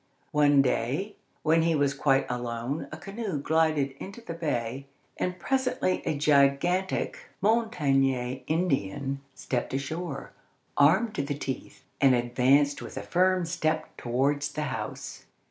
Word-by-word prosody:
One 145 -2 +5
day, 140 - -1 0.3
when 165 +1 +4
he 165 0 +2
was 145 -2 +2
quite 135 -2 +2
alone, 120 +3 -3
a 155 - -6
canoe 195 -1 -4
glided 155 -1 +2
into 200 +4 -8
the 225 -8 -7
bay, 135 -5 -3 0.3
and 180 0 -2
presently 255 -3 0
a 150 - 0
gigantic 155 - +2
Montagnais 135 - +1
Indian 140 - -1
stepped 125 0 -2
ashore, 140 +2 -4 0.4
armed 190 +10 +4
to - - -1
the 140 0 -3
teeth, 135 -2 -6 0.2
and 135 -2 +6
advanced 130 +4 +3
with - - -8
a - - -3
firm 185 0 +2
step 165 -2 -1
towards 140 +4 0
the 150 - -2
house. - - -6
145 Hz, 130 wpm, -28 LUFS, 135-175 Hz, 0.4 s, and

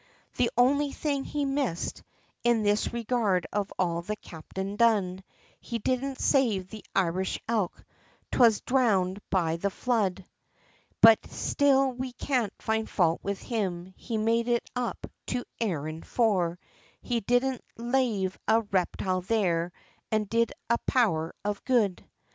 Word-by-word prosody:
The 240 - +3
only 280 +3 +3
thing 280 -2 -1
he 290 -1 -2
missed, 270 - -2 0.4
in 235 -2 +3
this 205 0 +1
regard 230 -6 0
of 205 -1 -1
all 170 -2 0
the 210 +5 -3
captain 190 +2 -7
done, 200 -5 +2 0.4
He 235 - -4
didn't 255 +4 -1
save 220 -10 +2
the 215 - -9
Irish 185 0 0
elk, 215 -6 -1 0.5
'twas 230 -4 +5
dhrownded 205 -8 +2
be 170 -4 +1
the 200 +4 0
flood, 195 -4 -1 0.8
But 225 -1 +9
still 275 -2 +2
we 255 0 -5
can't 245 -5 0
find 220 0 -1
fault 170 -3 +2
with 200 -1 -4
him, 190 -5 -3
he 230 - -4
made 230 +2 +1
it 240 -1 +1
up 245 -2 -3 0.2
to 250 0 -1 0.2
Erin, 160 -7 -2
for 185 -8 +1 0.5
He 240 -2 0
didn't 245 +3 +1
lave 235 -6 0
a 225 +1 +4
reptile 185 -2 -1
there, 180 -4 +1 0.4
an' 215 -1 +2
did 230 +3 +1 0.2
a 235 0 +2
power 165 - +1
of 205 -1 -2
good. 220 -8 +1
220 Hz, 135 wpm, -28 LUFS, 185-245 Hz, 0.8 s, But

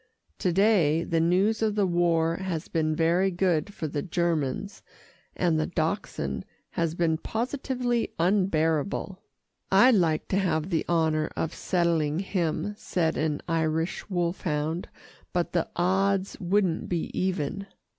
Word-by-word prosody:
To 180 - +1
day, 170 -5 +3
the 165 -1 0
news 190 +7 +2
of 215 -2 +1
the 205 -2 +2
war 170 -2 +2
has 185 -4 -3
been 155 -1 0
very 170 +4 +2
good 180 0 0
for 160 - -4
the 145 0 -3
Germans, 170 +1 -1 0.6
and 170 -3 +2
the 155 - 0
Dachshund 160 - -2 0.3
has 165 -1 -1
been 165 -2 +1
positively 245 +1 -2
unbearable." 180 0 +1 0.5
"I'd 210 +7 +7
like 165 -6 +2
to 195 - +2
have 175 -2 0
the 165 - 0
honour 160 -2 +2
of 160 - -1
settling 165 -4 0
him," 190 +1 -1
said 165 -3 0
an 155 -2 -1
Irish 160 +2 -1
wolfhound, 170 -3 -1 0.4
"but 175 -1 0
the 170 -2 0
odds 190 +2 +1
wouldn't 185 -2 0
be 170 -2 -2
even." 185 +1 -2
175 Hz, 135 wpm, -27 LUFS, 160-195 Hz, 0.6 s, I'd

